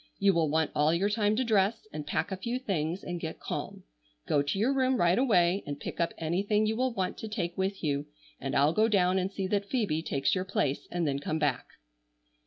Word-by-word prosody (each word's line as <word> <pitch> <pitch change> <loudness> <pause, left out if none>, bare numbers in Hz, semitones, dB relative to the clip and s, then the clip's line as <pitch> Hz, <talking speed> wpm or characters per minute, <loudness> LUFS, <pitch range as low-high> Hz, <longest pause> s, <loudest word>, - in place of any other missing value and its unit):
You 195 0 +4
will 165 -3 +2
want 160 +1 +1
all 150 +1 +3
your 200 +4 +1
time 210 -1 +2
to 255 - +1
dress, 220 -1 +1
and 150 -1 -5
pack 150 - -1
a - - -1
few 235 +6 -2
things, 185 - -2
and 175 -1 -4
get 160 -1 -5
calm. - - -5 0.4
Go 145 - +3
to 145 +6 -2
your 235 +7 +2
room 260 -1 +2
right 175 +2 +3
away 195 -7 +3
and 145 0 -4
pick - - -6
up 170 - +1
anything 200 +6 +1
you 220 +1 0
will 255 +2 +1
want 190 -5 -3
to 220 - -5
take 175 -5 -3
with 190 0 -2
you, 145 -1 -1 0.3
and 135 - -3
I'll 145 +3 +4
go 215 +3 +3
down 190 -3 +3
and 185 +1 -2
see 195 -1 -3
that 200 0 -1
Phoebe 205 -11 0
takes 140 -4 0
your 185 - 0
place 145 -7 -1
and 175 -2 -1
then 140 -1 0
come 155 +2 -2
back." 145 -5 0
185 Hz, 230 wpm, -29 LUFS, 155-210 Hz, 0.4 s, You